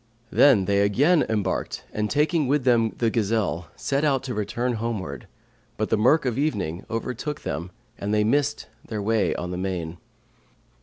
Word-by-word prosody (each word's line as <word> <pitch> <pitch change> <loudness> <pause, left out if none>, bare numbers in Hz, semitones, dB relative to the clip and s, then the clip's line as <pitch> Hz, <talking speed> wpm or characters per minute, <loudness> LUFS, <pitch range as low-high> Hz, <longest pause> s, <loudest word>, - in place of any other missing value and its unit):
Then 120 -10 +5
they 100 0 +2
again 145 - +3
embarked 105 -4 -2
and 105 0 -1
taking 150 0 +2
with 145 0 +2
them 115 -3 +3
the 115 -2 +1
gazelle, 105 -6 0
set 140 +1 -1
out 135 -4 +2
to 130 -2 -4
return 120 +4 -1
homeward, 95 - -4 0.5
but 110 - -1
the - - +3
murk 135 +8 +4
of 125 0 -1
evening 95 - -1
overtook 125 +5 -4
them 85 +5 -4 0.3
and 100 - -3
they 105 0 +3
missed 145 +6 +1 0.2
their 110 - -5
way 105 -2 +1
on 90 0 -4
the 90 - -3
main. 90 -3 -3
110 Hz, 165 wpm, -24 LUFS, 100-135 Hz, 0.5 s, Then